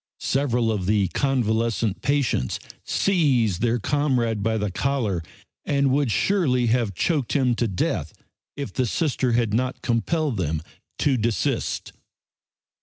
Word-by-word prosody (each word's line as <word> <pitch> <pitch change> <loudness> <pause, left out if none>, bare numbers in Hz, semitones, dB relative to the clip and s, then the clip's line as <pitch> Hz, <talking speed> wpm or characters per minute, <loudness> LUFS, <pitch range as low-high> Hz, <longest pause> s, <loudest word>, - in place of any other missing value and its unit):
Several 125 -4 +1
of 95 -4 -2
the 100 -3 +2
convalescent 115 -5 0
patients 135 - 0 0.3
seized 130 - +2
their 120 0 +2
comrade 120 -4 0
by 110 +1 0
the 105 -2 -1
collar, 115 -7 -1 0.4
and 140 -2 +1
would 140 -1 +2
surely 130 - +2
have 115 -6 0
choked 145 - 0
him 130 -4 +2
to 120 0 0
death 95 -4 -1 0.5
if 140 -1 -5
the 130 -2 0
Sister 130 -2 0
had 115 -3 +1
not 125 +3 -1
compelled 130 +3 0
them 80 -3 -1 0.3
to 135 -3 +2
desist. 115 -1 -1
120 Hz, 130 wpm, -24 LUFS, 110-140 Hz, 0.5 s, the